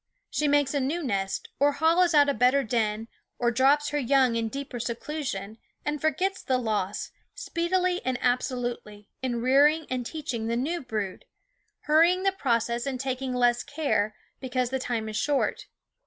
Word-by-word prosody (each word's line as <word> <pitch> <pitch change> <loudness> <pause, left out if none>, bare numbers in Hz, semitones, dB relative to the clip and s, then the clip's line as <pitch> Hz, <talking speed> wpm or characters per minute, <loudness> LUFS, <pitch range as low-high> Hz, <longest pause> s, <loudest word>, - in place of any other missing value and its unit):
She 300 - 0
makes 285 -1 +2
a 285 - +1
new 300 +6 -1
nest, 195 -6 -2
or 285 +1 +4
hollows 330 +3 +3
out 290 -1 +6
a 280 - +2
better 265 +2 +3
den, 220 -1 -1 0.3
or 240 -1 +1
drops 280 +4 +3
her 295 - -1
young 260 -2 +3
in 225 -1 -1
deeper 275 -1 -6
seclusion, 235 -4 -4 0.3
and 295 -1 -2
forgets 370 +6 0
the 260 - +1
loss, 210 -5 -2 0.2
speedily 360 +1 0
and 255 -1 -1
absolutely, 245 -4 -2
in 240 -3 -2
rearing 295 +5 +4
and 255 -1 -1
teaching 245 -5 -4
the 235 +1 0
new 325 +8 -1
brood, 215 -7 -4 0.6
hurry 320 +4 +5
ing 370 +1 -4
the 390 - +3
process 235 - 0
and 260 -2 -3
taking 260 -1 -2
less 240 -1 +3
care, 220 -8 -1 0.2
because 255 -1 -2
the 265 - -1
time 235 -3 -2
is 215 0 -4
short. 285 +2 0
260 Hz, 170 wpm, -27 LUFS, 235-295 Hz, 0.6 s, out